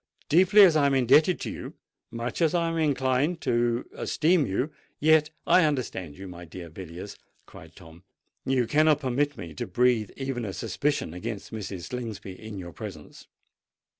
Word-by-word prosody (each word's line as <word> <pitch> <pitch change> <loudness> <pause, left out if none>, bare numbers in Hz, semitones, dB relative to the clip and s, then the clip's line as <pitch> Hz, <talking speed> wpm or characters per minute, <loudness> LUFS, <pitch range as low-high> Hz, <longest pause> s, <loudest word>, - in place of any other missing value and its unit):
Deeply 190 +6 +7
as 175 -5 +6
I 145 -2 +4
am 140 - +2
indebted 135 +8 +4
to - - -3
you—much 115 +6 -8
as 165 +1 +3
I 170 -1 +1
am 165 - -2
inclined 140 +2 +1
to 120 +1 +1
esteem 160 -3 +1
you—yet——" 150 +6 +1 0.2
"I 185 - +5
understand 120 - -2
you, 95 0 -8
my 90 -1 -9
dear 85 0 -10
Mr. - - -22
Villiers," 95 +3 -8 0.3
cried - - -14
Tom: 80 +1 -15 0.4
"you 130 -2 +1
cannot 150 +4 +3
permit 140 +2 0
me 85 -5 -8
to - - -5
breathe 115 +2 +2
even 135 -3 -3
a 100 -3 -4
suspicion 120 - -2
against 105 +3 -6
Mrs. 100 -5 -6
Slingsby 115 -6 -6
in 105 +2 -9
your 85 -3 -8
presence. - - -10
125 Hz, 165 wpm, -27 LUFS, 95-150 Hz, 0.4 s, Deeply